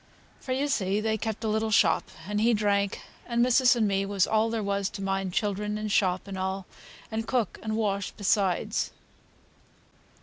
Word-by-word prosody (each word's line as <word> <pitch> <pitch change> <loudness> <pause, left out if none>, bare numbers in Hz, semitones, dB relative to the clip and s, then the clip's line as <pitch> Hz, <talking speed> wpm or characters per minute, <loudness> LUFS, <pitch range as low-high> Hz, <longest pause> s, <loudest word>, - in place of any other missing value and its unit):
For, 260 - -7
you 270 +3 +1
see, 200 -7 0
they 220 0 0
kept 220 +1 -4
a - - 0
little 220 +1 0
shop, 215 - +3 0.2
and 210 +1 -1
he 230 +1 +4
drank, 200 -1 0 0.2
and 235 0 +2
missis 250 0 +5
and 225 -3 +2
me 195 0 +1
was 195 -1 +1
all 220 +1 +2
there 225 -1 -2
was 200 -1 -1
to 195 - -8
mind 195 -1 -1
children, 210 +1 -1
and 215 0 -3
shop, 185 -1 +1
and 195 -1 -5
all, 190 0 -2 0.5
and 220 0 -3
cook 245 -6 -1
and 220 0 -2
wash 200 -3 0
besides." 205 +1 0
210 Hz, 180 wpm, -27 LUFS, 195-220 Hz, 0.5 s, missis